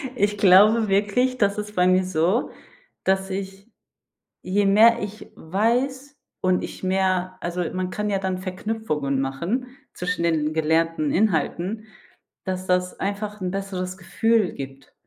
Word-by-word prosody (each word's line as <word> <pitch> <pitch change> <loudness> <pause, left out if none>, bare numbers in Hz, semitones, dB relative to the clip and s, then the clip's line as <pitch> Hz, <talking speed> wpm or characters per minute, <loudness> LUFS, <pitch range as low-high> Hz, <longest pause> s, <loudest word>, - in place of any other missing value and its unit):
Ich 205 -2 +1
glaube 210 +3 +6
wirklich, 210 +6 +1
das 200 -3 +1
ist 210 0 -5
bei 180 0 +3
mir 185 0 +4
so, 185 +5 0 0.5
dass 190 0 +1
ich, 195 +2 -6 0.7
je 200 +2 +1
mehr 225 +4 +6
ich 210 +1 -7
weiß 255 - -1 0.2
und 185 -1 +1
ich - - -8
mehr 185 -1 0
also, 175 +1 -3
man 185 0 -3
kann 210 +2 -2
ja 195 - +1
dann 190 -1 -2
Verknüpfungen 185 -7 -2
machen 170 - -2 0.3
zwischen 180 -1 -2
den 155 -2 +1
gelernten 160 -1 +1
Inhalten, 195 +2 0 0.6
dass 185 -1 -3
das 180 0 0
einfach 205 +1 -4
'n 180 -1 -2
besseres 190 -1 -4
Gefühl 220 +2 +1
gibt. 135 0 -9
190 Hz, 140 wpm, -23 LUFS, 180-210 Hz, 0.7 s, glaube